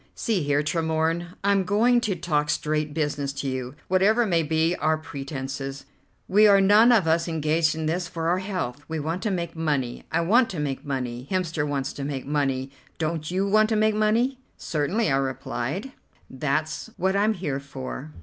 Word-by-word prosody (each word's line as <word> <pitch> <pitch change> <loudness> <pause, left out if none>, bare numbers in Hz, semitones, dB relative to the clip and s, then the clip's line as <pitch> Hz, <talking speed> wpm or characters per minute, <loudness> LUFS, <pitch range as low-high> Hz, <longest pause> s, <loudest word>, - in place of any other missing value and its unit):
"See 220 -6 0
here, 145 0 +1
Tremorne, 165 +2 -1
I'm 200 -1 +3
going 230 +6 +3
to 205 -5 -1
talk 150 -3 0
straight 150 0 0
business 145 -2 -1
to 140 0 -4
you. 130 0 -4
Whatever 205 +6 +3
may 170 -5 +2
be 160 +2 +1
our 155 +1 +1
pretences, 135 -2 -6 0.4
we 210 +3 +6
are 200 -1 +6
none 210 +5 +6
of 220 -7 +4
us 165 +1 +2
engaged 160 0 +1
in 160 0 -3
this 175 +3 -1
for 165 -2 -3
our 175 +2 +2
health; 180 -9 -4
we 160 -1 -3
want 165 +5 -3
to 215 - -1
make 170 -3 -3
money. 145 -7 -2
I 165 - +2
want 230 +9 +4
to 175 - -5
make 140 -3 -3
money; 125 -3 -4
Hemster 165 -5 -1
wants 140 -1 -2
to 140 - -6
make 140 -2 -4
money; 135 -2 -1 0.3
don't 155 -1 -2
you 190 +2 0
want 215 +2 +4
to 220 - +1
make 215 0 +3
money?" 225 +5 +1 0.2
"Certainly," 170 +6 0
I 135 - +3
replied, 135 - -3 0.4
"that's 150 +3 -2
what 190 +2 +1
I'm 210 +2 +2
here 150 -7 -3
for." 140 +1 -7
160 Hz, 185 wpm, -25 LUFS, 145-190 Hz, 0.4 s, we